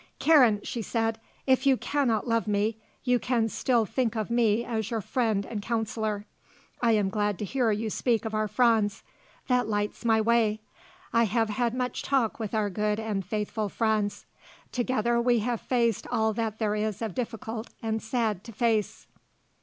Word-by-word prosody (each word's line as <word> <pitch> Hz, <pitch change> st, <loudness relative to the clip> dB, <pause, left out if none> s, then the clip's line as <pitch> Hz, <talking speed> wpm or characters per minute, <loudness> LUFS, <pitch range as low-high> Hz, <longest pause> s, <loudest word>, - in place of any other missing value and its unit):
"Karen," 255 Hz, -10 st, +5 dB
she 235 Hz, -, -4 dB
said, 225 Hz, 0 st, -1 dB, 0.3 s
"if 260 Hz, +1 st, +3 dB
you 265 Hz, -2 st, +5 dB
cannot 255 Hz, -7 st, 0 dB
love 230 Hz, -1 st, +1 dB
me, 210 Hz, +1 st, +1 dB, 0.3 s
you 250 Hz, -1 st, +2 dB
can 235 Hz, -1 st, +1 dB
still 235 Hz, 0 st, +1 dB
think 240 Hz, +1 st, -1 dB
of 220 Hz, 0 st, -2 dB
me 235 Hz, -1 st, +2 dB
as 220 Hz, -2 st, -2 dB
your 230 Hz, -2 st, -1 dB
friend 220 Hz, -2 st, 0 dB
and 215 Hz, -3 st, -5 dB
counsellor. 220 Hz, -2 st, -2 dB, 0.6 s
I 235 Hz, -2 st, +4 dB
am 205 Hz, -3 st, +2 dB
glad 205 Hz, -2 st, 0 dB
to 210 Hz, -, -3 dB
hear 250 Hz, +2 st, +1 dB
you 215 Hz, +1 st, -1 dB
speak 235 Hz, 0 st, 0 dB
of 220 Hz, -, -3 dB
our 215 Hz, 0 st, +1 dB
Franz. 220 Hz, -3 st, +2 dB, 0.4 s
That 250 Hz, -3 st, +2 dB
lights 205 Hz, +1 st, -2 dB
my 225 Hz, -1 st, +3 dB
way. 220 Hz, -1 st, +2 dB, 0.5 s
I 230 Hz, 0 st, +4 dB
have 225 Hz, +1 st, +1 dB
had 235 Hz, +2 st, 0 dB
much 250 Hz, 0 st, -2 dB
talk 260 Hz, -6 st, 0 dB
with 220 Hz, -1 st, -3 dB
our 210 Hz, -2 st, 0 dB
good 210 Hz, +2 st, 0 dB
and 215 Hz, -3 st, -2 dB
faithful 210 Hz, +2 st, -2 dB
Franz. 215 Hz, -1 st, 0 dB, 0.5 s
Together 240 Hz, -1 st, +1 dB
we 240 Hz, 0 st, +3 dB
have 235 Hz, +1 st, -1 dB
faced 235 Hz, -4 st, 0 dB
all 220 Hz, -2 st, +1 dB
that 220 Hz, -1 st, -2 dB
there 215 Hz, -2 st, 0 dB
is 215 Hz, 0 st, -2 dB
of 220 Hz, -4 st, -3 dB
difficult 225 Hz, -1 st, -4 dB
and 220 Hz, 0 st, -1 dB
sad 220 Hz, -4 st, -1 dB
to 230 Hz, -, -8 dB
face. 220 Hz, -2 st, 0 dB
225 Hz, 175 wpm, -27 LUFS, 210-235 Hz, 0.6 s, Karen